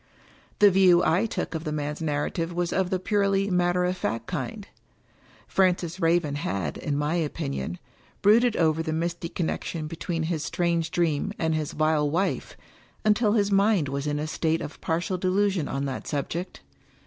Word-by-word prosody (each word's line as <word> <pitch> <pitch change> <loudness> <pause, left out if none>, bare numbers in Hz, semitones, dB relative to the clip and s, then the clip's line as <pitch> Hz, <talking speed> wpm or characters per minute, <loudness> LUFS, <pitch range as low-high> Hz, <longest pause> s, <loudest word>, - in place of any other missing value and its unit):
The 205 -1 +7
view 180 -2 +5
I 180 +8 +3
took - - -3
of 160 -1 -3
the 155 - -3
man's 150 +1 -3
narrative 160 +2 -1
was 175 0 -1
of 190 -1 +1
the 185 - +1
purely 200 0 +1
matter 180 0 +2
of 180 +1 0
fact 115 - -3
kind. 210 - -5 0.8
Francis 180 -2 +1
Raven 165 -3 +2
had, 95 - -2
in 145 -1 -2
my 150 +2 0
opinion, 85 - -2 0.5
brooded 230 +3 +5
over 160 -1 +2
the 160 -1 -2
misty 170 +1 -2
connection 165 -2 -3
between 165 +1 -3
his 160 -2 -2
strange 170 -2 0
dream 170 +3 0
and 160 -1 0
his 155 -2 -2
vile 155 -1 +2
wife, 180 +6 -1 0.5
until 210 0 +3
his 205 -2 +2
mind 200 -6 +3
was 140 +1 -3
in 145 0 0
a 150 - -2
state 160 +1 0
of 150 - -8
partial 170 +3 -1
delusion 185 -3 +1
on 135 +1 -2
that 135 -2 -5
subject. 160 +5 -4
170 Hz, 170 wpm, -26 LUFS, 150-185 Hz, 0.8 s, The